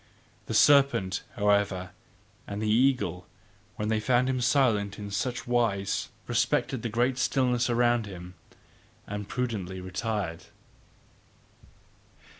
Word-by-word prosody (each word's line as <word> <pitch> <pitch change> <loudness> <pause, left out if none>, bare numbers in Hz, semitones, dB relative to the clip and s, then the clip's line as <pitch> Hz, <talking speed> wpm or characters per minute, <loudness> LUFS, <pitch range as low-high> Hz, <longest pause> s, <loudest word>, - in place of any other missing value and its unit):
The - - -3
serpent, 135 -10 +4
however, 100 -3 +1 0.6
and 100 0 -5
the 110 - -2
eagle, 120 -5 +1 0.5
when 105 0 -3
they 110 -1 +1
found 125 +3 +2
him 130 -1 -1
silent 115 -6 +2
in 100 -1 -7
such 125 +6 -2
wise, 115 -5 0 0.2
respected 130 -4 0
the 115 - -3
great 120 +3 0
stillness 125 -2 +1
around 120 -2 +2
him, 90 -2 -9 0.7
and 105 -1 -6
prudently 105 -7 -3
retired. 95 -2 -4
110 Hz, 110 wpm, -28 LUFS, 100-125 Hz, 0.7 s, serpent